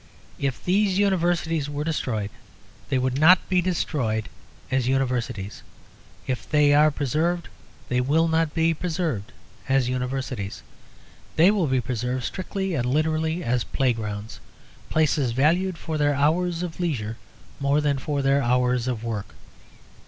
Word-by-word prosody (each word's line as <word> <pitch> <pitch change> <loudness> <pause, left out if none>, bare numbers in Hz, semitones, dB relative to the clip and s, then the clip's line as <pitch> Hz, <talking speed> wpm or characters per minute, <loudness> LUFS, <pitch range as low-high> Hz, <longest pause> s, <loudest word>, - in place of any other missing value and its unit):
If 135 -2 -2
these 195 +1 +2
Universities 175 -6 +1
were 145 0 -3
destroyed, 115 -10 -2 0.6
they 135 - +2
would 130 +1 0
not 175 +5 +6
be 185 -1 +3
destroyed 135 -11 -1 0.4
as 130 -2 +1
Universities. 125 -6 -1 0.6
If 130 -2 -4
they 150 -1 +4
are 150 +1 +6
preserved, 155 +5 -1 0.4
they 125 0 +1
will 155 +6 +2
not 160 -1 +1
be 165 0 +3
preserved 155 - -2 0.4
as 135 -2 +3
Universities. 125 -5 -3 0.7
They 170 +5 +6
will 195 -6 +1
be 130 -1 +1
preserved 125 +1 -2
strictly 190 +3 -3
and 125 -6 0
literally 160 +4 0
as 120 -2 +1
playgrounds; 110 -5 -2 0.5
places 145 -5 +2
valued 170 +7 +2
for 155 -1 -4
their 145 -1 +2
hours 165 +4 +1
of 175 -1 -6
leisure 115 -11 -2 0.4
more 140 +1 +2
than 145 -2 +1
for 140 +1 -2
their 135 +1 +3
hours 125 0 +1
of 120 -3 -2
work. 110 -4 -4
145 Hz, 140 wpm, -24 LUFS, 125-165 Hz, 0.7 s, not